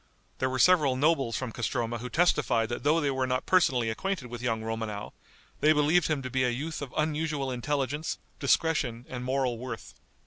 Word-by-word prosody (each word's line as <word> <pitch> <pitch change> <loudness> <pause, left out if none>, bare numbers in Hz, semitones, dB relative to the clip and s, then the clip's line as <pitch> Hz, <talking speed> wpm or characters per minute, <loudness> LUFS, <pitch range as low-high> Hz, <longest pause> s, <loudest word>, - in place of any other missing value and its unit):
There 130 - +1
were 130 - -2
several 150 -4 +5
nobles 135 -5 +2
from 130 -3 -4
Castroma 120 +1 -2
who 125 +2 -6
testified 120 -8 +2
that 120 - -3
though 150 +3 +3
they 145 -3 +1
were 130 -1 -1
not 130 0 -1
personally 135 -10 +3
acquainted 140 +3 -3
with 120 0 -7
young 115 -3 -1
Romanow, 110 -2 -4 0.5
they 155 +1 +5
believed 155 +3 +3
him 150 -4 -1
to 130 - -4
be 130 +1 +1
a 125 - +2
youth 150 +7 -4
of 140 -3 -6
unusual 150 -3 -1
intelligence, 140 +4 -2 0.2
discretion 140 -5 +1
and 125 -1 -5
moral 130 -2 0
worth. 115 -9 -7
130 Hz, 185 wpm, -28 LUFS, 120-150 Hz, 0.5 s, several